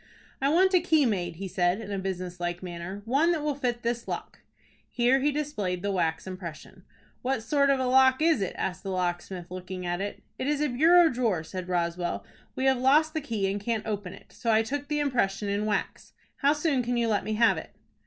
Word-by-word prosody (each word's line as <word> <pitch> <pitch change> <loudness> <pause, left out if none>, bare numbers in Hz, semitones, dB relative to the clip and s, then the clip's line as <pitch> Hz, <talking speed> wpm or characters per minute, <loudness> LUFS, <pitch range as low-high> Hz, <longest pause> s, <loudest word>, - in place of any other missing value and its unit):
"I 275 - +3
want 375 +5 +4
a 365 - +6
key 320 -4 +3
made," 180 -7 -1
he 195 +3 -5
said, 180 +1 +1
in 210 -2 -7
a 200 - -2
business 185 -2 -4
like 175 +1 -3
manner; 180 +3 -6
"one 280 +9 +3
that 310 -3 -2
will 300 -1 0
fit 245 -3 -2
this 235 0 -2
lock." - - -5 0.5
Here 250 +2 +3
he 290 +2 +2
displayed 210 -12 -2
the 200 - 0
wax 165 -4 0
impression. 185 0 -8 0.4
"What 260 -3 -1
sort 280 +2 +2
of 275 -1 +3
a 260 - 0
lock 260 +1 +5
is 320 -7 +3
it?" 195 - -2
asked 185 0 -3
the 195 - -6
locksmith, 180 -1 -3
looking 185 0 -6
at 175 +1 -2
it. 200 +1 -5 0.2
"It 260 - -2
is 295 0 +1
a 300 0 +1
bureau 330 +7 +6
drawer," 230 - 0
said 185 +2 -6
Roswell. 175 0 -1 0.3
"We 260 - -1
have 265 -2 +3
lost 300 +5 +4
the 315 - -1
key, 225 -8 -1
and 200 +1 -3
can't 225 0 -2
open 205 -4 -4
it. 195 - -16
So 230 - -1
I 220 0 +4
took 285 +5 -4
the 300 0 -1
impression 210 -8 0
in 205 +1 -1
wax. 210 - -3 0.2
How 285 +1 +3
soon 295 -3 +1
can 245 0 -1
you 235 -1 +1
let 215 -2 +1
me 215 - -2
have 230 +1 +4
it?" - - -12
220 Hz, 225 wpm, -27 LUFS, 185-275 Hz, 0.5 s, a